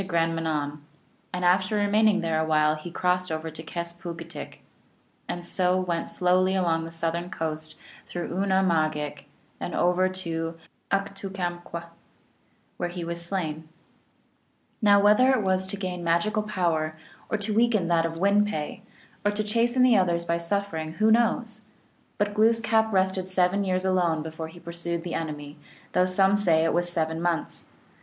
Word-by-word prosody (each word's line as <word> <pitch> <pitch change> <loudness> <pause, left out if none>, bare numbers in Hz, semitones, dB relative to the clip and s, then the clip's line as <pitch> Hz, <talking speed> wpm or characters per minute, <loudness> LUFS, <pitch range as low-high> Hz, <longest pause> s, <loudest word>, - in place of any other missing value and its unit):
33 190 - -7
Grand 165 -1 +1
Manan; 150 -3 -2 0.5
and 180 0 -2
after 185 +4 +3
remaining 205 0 +3
there 165 -2 0
a - - +2
while 155 -1 +3
he 155 +3 -7
crossed 180 0 0
over 160 0 -3
to 160 - -8
Kes 170 +1 -5
poog 170 -2 -5
itk 165 0 -10
(Yarmouth), - - -8 0.7
and 175 0 -4
so 180 +1 +1
went 175 -2 -2
slowly 185 +1 +2
along 165 -3 +1
the 165 - -8
southern 165 +1 -2
coast 155 -1 -4 0.3
through 175 -1 -4
Oona 190 0 +2
mahgik 160 -4 +2
(Cape 150 -1 -4
Breton), - - -19 0.3
and - - -4
over 180 +1 +3
to 165 -3 -3 0.3
Uktukkamkw 195 0 0
(New 195 0 -6
foundland), 175 -2 -4 0.9
where 175 - -2
he 175 0 -5
was 170 0 -4
slain. 160 -4 -4 1.1
Now 205 -2 +6
whether 210 +6 +5
it 240 -5 +1
was 190 0 +1
to 200 - +1
gain 180 -2 -4
magical 170 +6 +1
power, 165 -6 -1 0.3
or 220 - 0
to 210 +1 -1
weaken 220 -5 +3
that 165 -1 +3
of 165 0 -3
Win 200 +3 +4
pe, 155 -8 -4 0.4
or 205 - +3
to 205 +1 -1
chasten 235 +4 +2
the 245 -4 +6
others 170 -2 +1
by 170 0 0
suffering, 170 -3 -2
who 215 +5 +3
knows? 230 -1 +1 0.6
But 205 0 0
Glooskap 220 0 +3
rested 190 -1 +1
seven 185 +2 +2
years 185 -1 0
alone 175 -4 +1
before 160 0 -6
he 165 +2 -13
pursued 170 0 -4
the 175 - -5
enemy, 150 -2 -5 0.3
though 180 - +3
some 190 +2 +3
say 170 -6 +3
it 165 - +1
was 175 +1 +1
seven 160 -1 -1
months. 170 -2 -2
180 Hz, 175 wpm, -26 LUFS, 165-200 Hz, 1.1 s, Now